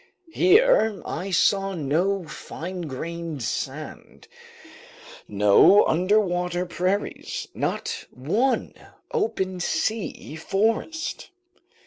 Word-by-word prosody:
Here 370 - +4
I 185 +4 -4
saw 195 +2 +2
no 175 +6 0
fine 175 +5 -7
grained 165 0 -5
sand, - - -6 1.0
no 105 - +6
underwater 180 -1 +1
prairies, 185 +3 -2
not - - -3
one 210 - 0 0.4
open 190 - -1
sea 205 -3 -2
forest. 225 - -1
185 Hz, 75 wpm, -24 LUFS, 170-210 Hz, 1.0 s, no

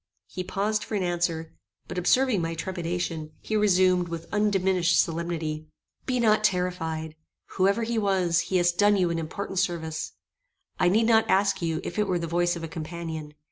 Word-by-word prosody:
He 185 - -5
paused 205 +3 -1
for 215 - -4
an 195 - 0
answer; 170 -2 -1 0.3
but - - -3
observing 250 +2 +3
my 165 0 -2
trepidation, 165 -2 -3
he 220 - -3
resumed, 185 -3 +3
with 165 -1 -6
undiminished 190 -4 +2
solemnity: 160 -2 -2 0.4
"Be 255 -1 +1
not 215 -2 +3
terrified. 180 -5 -1 0.4
Whoever 200 +4 +3
he 230 0 0
was, 185 -5 +2
he 190 - +2
hast 175 0 +2
done 205 0 +5
you 180 -3 +2
an 165 - -1
important 185 +4 -4
service. 160 -4 -2 0.7
I 180 - +4
need 220 +5 +3
not 225 -1 +4
ask 195 0 +2
you 165 -2 -1
if 175 - -4
it 210 - +2
were 185 -2 +1
the 170 - -3
voice 175 +1 +1
of 170 - -7
a - - -3
companion. 160 -2 -6
180 Hz, 180 wpm, -26 LUFS, 165-200 Hz, 0.7 s, done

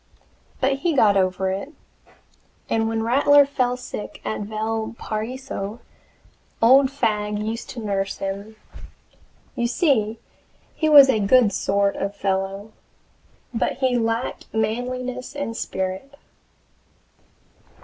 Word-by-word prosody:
But 270 0 +1
he 330 +2 0
got 210 -6 +5
over 190 0 +1
it, 200 +11 -5 0.9
and 225 0 0
when 225 0 -1
Rattler 285 +4 +5
fell 250 -3 -1
sick 250 -4 -7
at - - -2
Valparaiso, 220 +1 -4 0.8
old 260 +4 +6
Fagg 210 -6 -1
used 220 +2 -4
to 235 -3 -7
nurse 195 -1 -2
him. 200 +3 -5 1.0
You 235 - 0
see 235 - +1 0.6
he 315 - 0
was 285 -3 +9
a 250 -5 +2
good 210 +1 +4
sort 200 +1 +1
of 200 +1 -3
fellow, 195 +1 -2 0.8
but 225 - 0
he 260 -1 0
lacked 230 +1 -2
manliness 250 +4 -3
and 285 -6 -4
spirit. 190 +8 -4
225 Hz, 110 wpm, -23 LUFS, 205-255 Hz, 1.0 s, was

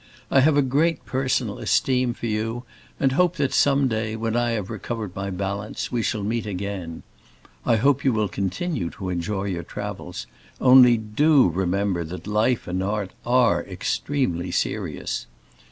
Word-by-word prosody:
I 135 - +5
have 145 +2 +4
a 145 - +5
great 150 +5 +1
personal 130 -4 -1
esteem 125 -2 +1
for - - -6
you 115 +2 -2 0.4
and 135 - +3
hope 180 +5 +2
that 140 -5 0
some 140 -1 +3
day, 110 -2 -2
when 115 0 -2
I 120 -1 +1
have 105 -2 -3
recovered 110 -2 -5
my 100 0 -3
balance, 100 +2 -4
we 120 - 0
shall 110 -2 -1
meet 110 +1 -2
again. 95 -4 -5 0.6
I 115 - +5
hope 140 +5 +2
you 135 - +3
will 110 -2 +1
continue 100 - -2
to 95 - -4
enjoy 90 +3 -2
your 95 -4 -2
travels, - - -6 0.3
only 125 -2 +7
do 130 - +3
remember 95 +1 0
that 90 +3 -8
Life 110 +4 +1
and 90 +1 -2
Art 100 -1 -2 0.2
are 125 -2 +3
extremely 90 -12 -2
serious. - - -2
110 Hz, 160 wpm, -24 LUFS, 95-130 Hz, 0.6 s, only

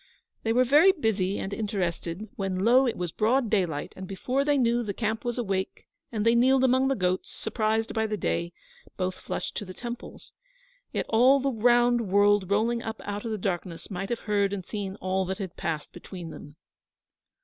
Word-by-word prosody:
They 225 - 0
were 250 +2 +4
very 295 +9 +6
busy 205 - 0
and 195 - -4
interested, 195 -2 -3
when, 190 -1 -2
lo! 255 +3 +5
it 235 - -2
was 175 -2 -3
broad 230 +4 +1
daylight, 175 -8 0
and 190 0 -7
before 250 +9 -1
they 290 0 +2
knew, 240 -2 +2
the 205 -4 -4
camp 220 -1 -2
was 240 0 -2
awake, 195 -5 -2 0.3
and 215 -2 -2
they 230 - +5
kneeled 260 +2 +4
among 260 +1 +4
the 270 - +1
goats, 185 -2 -1
surprised 220 0 -1
by 220 -1 0
the 210 0 -2
day, 170 -3 -1 0.5
both 185 -1 -1
flushed - - -5
to - - -3
the 185 -2 -9
temples. 240 -1 -8 0.6
Yet - - -2
all 255 +5 +5
the 275 +1 0
round 240 0 +3
world 205 -1 +4
rolling 230 +4 +1
up 225 -1 -5
out 205 +2 -4
of 225 - -2
the 215 - -1
darkness 180 -1 -4
might 195 +1 -4
have 235 - -2
heard 200 -2 +1
and 190 -3 -4
seen 200 -2 -4
all 190 -1 -1
that 190 +1 -3
had 190 -5 -6
passed 155 -3 -3
between 175 -1 -9
them. 145 0 -11
210 Hz, 195 wpm, -27 LUFS, 190-240 Hz, 0.6 s, very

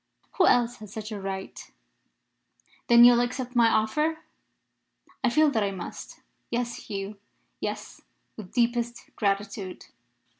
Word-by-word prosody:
"Who 370 - +5
else 240 0 +3
has 215 -2 -11
such 215 +1 -6
a 205 -2 -5
right?" 190 0 -6 1.2
"Then 235 0 +8
you 245 - +10
will 240 - +3
accept 250 +1 -3
my 235 -1 +5
offer?" 300 +10 +1 1.1
"I 255 - +4
feel 305 +4 +4
that 225 -5 +1
I 200 - +1
must. 185 -3 -8 0.3
Yes, 240 0 -3
Hugh; 200 0 -5 0.4
yes, - - -5 0.3
with 205 -4 -10
deepest 235 -1 -1
gratitude." 200 -2 -2
230 Hz, 135 wpm, -27 LUFS, 200-245 Hz, 1.2 s, you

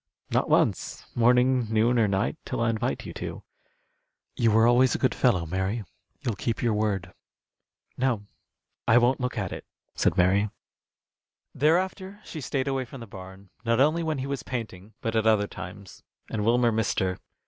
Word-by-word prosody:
"Not - - +1
once, - - +1
morning, 125 0 +3
noon, 115 +2 +3
or 110 - +4
night, 100 +8 0
till 125 - -4
I 115 0 +2
invite 110 - -2
you - - -7
to. - - -6 0.9
You 115 - +3
were 110 +1 +5
always 120 +2 +4
a - - +1
good 130 - +1
fellow, 100 -10 +2
Mary. 95 +6 -2 0.4
You'll 125 -5 -1
keep 115 +3 -2
your 115 -2 +2
word." 105 -3 -1 0.9
"No, 125 -5 +1 0.6
I 110 - +6
won't 125 +2 +3
look 125 -2 -2
at 95 -4 -2
it," - - -6 0.3
said 85 - +1
Mary. 95 +3 +3 1.0
Thereafter 185 +6 0
she 155 - -7
stayed 130 0 -2
away 135 -1 0
from 130 +2 -10
the - - -7
barn, 95 -1 -12
not 115 0 +1
only 155 +5 +3
when 160 -3 -1
he 130 - -3
was 140 -1 -3
painting, 110 -5 -6
but 115 -2 -2
at 110 0 +2
other 110 -2 +4
times, 100 +1 -10 0.3
and 105 -2 -1
Wilmer 120 +1 +3
missed 110 0 0
her. 95 -1 -1
115 Hz, 175 wpm, -26 LUFS, 105-130 Hz, 1.0 s, I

